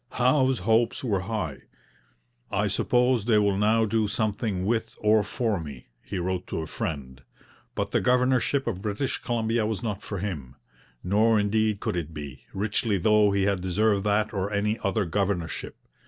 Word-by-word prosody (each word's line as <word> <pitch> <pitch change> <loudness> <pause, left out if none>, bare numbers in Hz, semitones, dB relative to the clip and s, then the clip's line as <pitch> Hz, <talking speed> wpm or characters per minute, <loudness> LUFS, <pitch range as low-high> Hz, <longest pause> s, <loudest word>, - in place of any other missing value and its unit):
Howe's 130 +1 +3
hopes 115 +5 +1
were 105 -6 +1
high. 95 -8 -3 0.9
'I - - 0
suppose 125 -3 +2
they 115 -2 +4
will 100 -2 +3
now 110 +3 +3
do 110 0 +1
something 105 -2 -1
with 115 +1 -1
or 105 0 +4
for 105 -1 -1
me,' 70 -7 -9
he - - -6
wrote 90 +1 -2
to - - -3
a - - -4
friend. 65 -5 -5 0.5
But - - -2
the - - +2
governorship 125 +2 +2
of 95 -6 -3
British 105 +6 -2
Columbia 115 -1 0
was 110 +1 -3
not 105 -4 -3
for 100 - -5
him. 75 -10 -5 0.5
Nor 110 +4 +3
indeed 105 0 +1
could - - -2
it 80 -2 -4
be, 70 -3 -8
richly 105 +1 0
though 105 +2 +4
he 100 -1 +1
had 100 -2 +1
deserved 100 +2 +1
that 105 +1 +1
or 100 0 -2
any 105 +2 0
other 100 +1 0
governorship. 90 -2 -2
105 Hz, 170 wpm, -26 LUFS, 95-110 Hz, 0.9 s, they